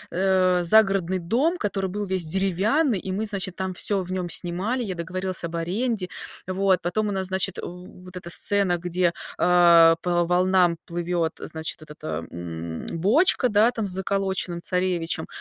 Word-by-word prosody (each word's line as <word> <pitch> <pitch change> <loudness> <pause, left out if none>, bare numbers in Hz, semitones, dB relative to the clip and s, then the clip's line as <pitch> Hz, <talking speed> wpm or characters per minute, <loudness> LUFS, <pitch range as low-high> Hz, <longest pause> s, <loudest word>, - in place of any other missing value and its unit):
э, 185 -1 +2
загородный 195 -1 +3
дом, 255 - 0
который 195 -2 -2
был 205 0 -4
весь 185 -2 0
деревянный, 195 - +1
и 185 +1 -5
мы, 210 +3 -2
значит, 190 -3 -3
там 190 -1 -3
всё 200 +2 0
в 185 0 -7
нем 180 -2 -3
снимали, 195 +9 -1
я 190 -5 -4
договорилась 185 +2 -3
об 170 0 -4
аренде. 195 +4 -2 0.4
Вот 185 -1 +1
потом 195 +5 -1
у - - -2
нас, 190 -1 -2
значит, 190 0 -1
э, - - -4 0.4
вот 180 0 -10
эта 170 -1 -9
сцена, 200 -2 +3
где, 175 0 0 0.2
а, 170 -2 +6
по 175 -1 +1
волнам 180 0 +2
плывет, 170 -1 -2
э, - - -7
значит 160 0 -4
этот, 150 -1 -14
а, 80 +1 -4
м, 85 -1 -6
бочка, 250 - +3
да, 215 +2 +4
там 225 -4 -3
с 190 - -1
заколоченным 190 -2 -1
царевичем. 180 -3 -1
185 Hz, 170 wpm, -24 LUFS, 170-195 Hz, 0.4 s, а